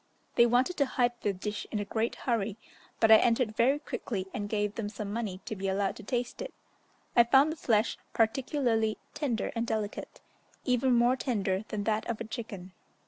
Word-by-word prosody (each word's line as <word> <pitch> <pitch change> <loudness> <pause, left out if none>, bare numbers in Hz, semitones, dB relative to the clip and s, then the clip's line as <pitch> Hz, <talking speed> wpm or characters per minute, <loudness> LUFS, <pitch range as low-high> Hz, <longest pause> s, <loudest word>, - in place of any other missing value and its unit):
They 235 0 +6
wanted 255 +9 +2
to 280 -2 +2
hide 245 -1 +2
the 205 - +1
dish 205 +2 -5
in 215 - -2
a 205 - -2
great 220 +3 -1
hurry, 225 -4 -1 0.4
but 225 -1 +5
I 220 - +11
entered 230 -1 +2
very 260 +6 +4
quickly 205 -9 -4
and 205 -1 -3
gave 210 -1 0
them 215 -2 -3
some 210 -1 -5
money 210 -5 -3
to 215 - -4
be 195 0 -3
allowed 195 0 0
to - - -9
taste 240 - -3
it. - - -6 0.6
I 235 - +8
found 270 +5 +5
the - - -4
flesh 225 -7 +1
particularly 230 -2 +1 0.2
tender 270 -7 -1
and 230 0 -1
delicate, 215 -2 -3 0.5
even 250 0 +3
more 240 +2 +4
tender 205 -6 -1
than 210 -1 -3
that 220 +1 -1
of 230 - -2
a - - -3
chicken. 215 -5 -7
225 Hz, 195 wpm, -30 LUFS, 210-245 Hz, 0.6 s, I